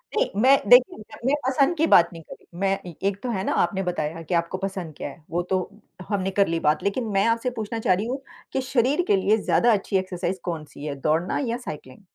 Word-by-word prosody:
नहीं, 485 +3 +2
मैं 270 +3 +7
देखिए, 245 +1 +6
मैं 215 - -14
अपने 260 +4 -1
पसंद 275 +5 +2
की 320 - +3
बात 170 - +6
नहीं 165 - -9
कर - - -11
रही। 170 - -17
मैं 195 0 +1 0.3
एक 200 -1 -1
तो 250 - -2
है 190 -4 -2
ना, - - -1
आपने 195 -1 +1
बताया 165 -2 -3
कि 165 - -5
आपको 170 +2 0
पसंद 190 -4 -5
क्या - - -5
है? 145 +3 -14
वो 175 +2 0
तो 190 - +2 0.5
हमने 195 -2 -1
कर 200 +1 +2
ली 165 0 -1
बात 150 -1 +1
लेकिन 225 +4 -1
मैं 195 0 +3
आपसे 230 +2 +1
पूछना 220 +1 -3
चाह 190 - +3
रही 195 +4 -1
हूँ 260 +3 -3 0.3
कि 265 - 0
शरीर 260 +4 +1
के - - +4
लिए 200 +3 +2
ज़्यादा 235 +2 +2
अच्छी 195 -1 0
एक्सरसाइज़ 185 0 -3
कौन-सी 155 -4 -6
है? 145 -2 -3
दौड़ना 160 +5 +1
या 235 - -1
साइक्लिंग? 150 - -9
195 Hz, 235 wpm, -24 LUFS, 170-235 Hz, 0.5 s, मैं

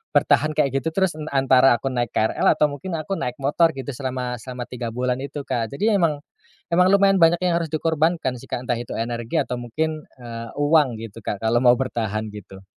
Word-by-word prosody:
bertahan 155 0 +3
kayak 145 -3 +2
gitu 160 +3 -4
terus 190 -2 +2
n 155 - -6
antara 135 -3 +4
aku 135 +3 -3
naik 120 -3 -2
KRL 110 - +1
atau 150 -1 +2
mungkin 165 +5 -5
aku 160 +5 -3
naik 125 0 -3
motor 155 +5 +2
gitu 135 +1 -5
selama 125 -2 -4
selama 125 +2 -6
3 120 -2 -5
bulan 125 0 -1
itu, 140 +2 -5
Kak. 115 -3 -3
Jadi, 210 +10 +1
emang 165 -8 +1 0.5
emang 180 +2 +4
lumayan 195 -1 +5
banyak 165 +1 +5
yang 180 -2 +2
harus 165 -3 -3
dikorbankan 160 -3 0
sih, - - -12
Kak, 120 - -3
entah 120 - +1
itu 120 0 -6
energi 115 0 -2
atau 125 - -3
mungkin, 155 +6 -3 0.2
eee, 115 -1 -7
uang 145 -6 +3
gitu, 115 -1 -9
Kak, 100 - -3
kalau 115 +1 +2
mau 120 -1 +7
bertahan 110 -4 -2
gitu. 95 -2 -11
135 Hz, 205 wpm, -22 LUFS, 120-160 Hz, 0.5 s, mau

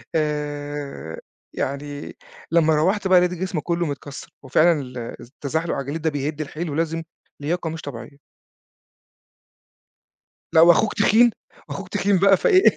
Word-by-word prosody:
آآ، 145 - -3 0.3
يعني 145 +1 -4 0.4
لمّا 160 -2 +4
روّحت 190 +6 +1
بقى 185 -1 +7
لقيت 180 0 +1
جسمي 180 -3 -3
كلّه 170 0 -1
متكسّر، 145 0 -7
وفعلًا 155 +3 +3
ال 125 -1 -9 0.2
التزحلق 155 +5 -3
على - - -2
الجليد 145 +4 -5
ده 160 - +1
بيهد 145 +1 -3
الحيل 155 +3 -4
ولازم 165 +2 -1 0.4
لياقة 165 +2 -1
مش 160 0 -6
طبيعية. 140 +1 -8 2.3
لأ، 160 -1 +6
وأخوك 175 +5 +5
تخين، 235 +3 +5 0.4
وأخوك 195 0 -6
تخين 200 -1 +2
بقى، 195 0 +6
فإيه 375 - +4
160 Hz, 130 wpm, -22 LUFS, 145-175 Hz, 2.3 s, بقى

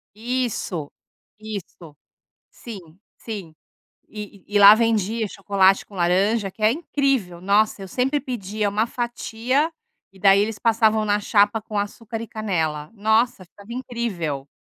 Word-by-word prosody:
Isso, 225 - -3 0.5
isso. 195 -7 -8 0.6
Sim, 225 -5 -9 0.4
sim. 195 -8 -7 0.5
E 205 -3 -9
e 205 - -3
e - - +7
lá 205 +1 +10
vendia 220 -1 +1
chocolate 195 -1 +2
com 205 - -16
laranja, 195 +4 +2
que 215 - -14
é 215 - +5
incrível! 270 - -1
Nossa, 200 +1 +2
eu 190 - -8
sempre 270 +6 0
pedia 215 -5 -3
uma 210 +3 0
fatia 240 +5 -1 0.4
e 190 - -18
daí 200 0 +6
eles 215 +1 -1
passavam 220 -2 +3
na 205 0 +2
chapa 205 +1 +3
com 215 -2 -4
açúcar 220 +2 -4
e 230 - -7
canela. 160 -8 -2
Nossa, 220 0 +1
ficava 200 +5 -14
incrível! 205 - -4
210 Hz, 140 wpm, -23 LUFS, 195-230 Hz, 0.6 s, lá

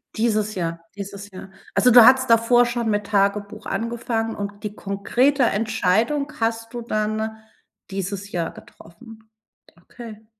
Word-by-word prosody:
Dieses 215 -2 0
Jahr, 170 -2 -3 0.2
dieses 200 0 -8
Jahr. 190 +1 -11 0.2
Also, 250 - +4
du 240 0 +9
hattest 260 +1 +5
davor 230 +2 +5
schon 240 -1 -2
mit 210 -1 0
Tagebuch 205 +1 0
angefangen, 230 -1 -2
und 205 0 -6
die 210 -1 -4
konkrete 245 +9 +1
Entscheidung 225 +6 0
hast 225 +1 -2
du 240 - -5
dann 220 0 -2 0.5
dieses 195 +1 -4
Jahr 170 -2 -2
getroffen? 220 +6 -16 0.5
Okay. 220 +2 -12
220 Hz, 135 wpm, -22 LUFS, 200-235 Hz, 0.5 s, du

